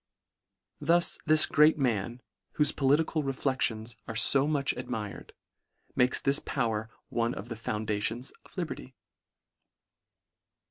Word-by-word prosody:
Thus 170 +4 +2
this 155 0 +6
great 155 +1 +4
man, 120 -2 -1 0.3
whofe 150 -1 +2
political 150 +3 +2
re 135 -2 -2
flections 120 -4 -2
are 115 - -5
fo 135 +5 +4
much 145 -3 0
admired, 105 -5 -6 0.6
makes 125 +1 +3
this 140 +1 +2
power 110 -1 -2 0.2
one 115 0 -1
of 110 - -8
the 115 - -4
foundations 110 +2 -3
of - - -20
liberty. 155 -6 -5
125 Hz, 120 wpm, -29 LUFS, 115-145 Hz, 0.6 s, this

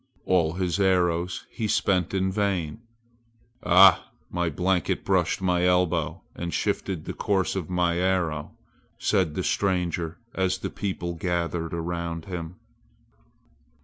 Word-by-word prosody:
All 85 -4 +2
his 90 +1 -1
arrows 90 -2 +1
he 110 - -3
spent 95 -4 +1
in 95 -1 0
vain. 100 -2 -1 0.8
"Ah! 95 +2 +6 0.2
my 85 -1 0
blanket 90 +2 0
brushed - - +1
my 90 -1 +2
elbow 90 -3 +1
and 85 0 -4
shifted 95 -4 -2
the - - -4
course 95 -2 0
of 90 -4 -3
my 90 -1 +1
arrow!" 90 -5 0 0.4
said 85 -6 +1
the - - -1
stranger 90 -4 0 0.2
as 95 -1 0
the - - -5
people 90 -4 -3
gathered 85 -1 -2
around 85 -1 -3
him. 90 -2 -6
90 Hz, 125 wpm, -26 LUFS, 85-95 Hz, 0.8 s, Ah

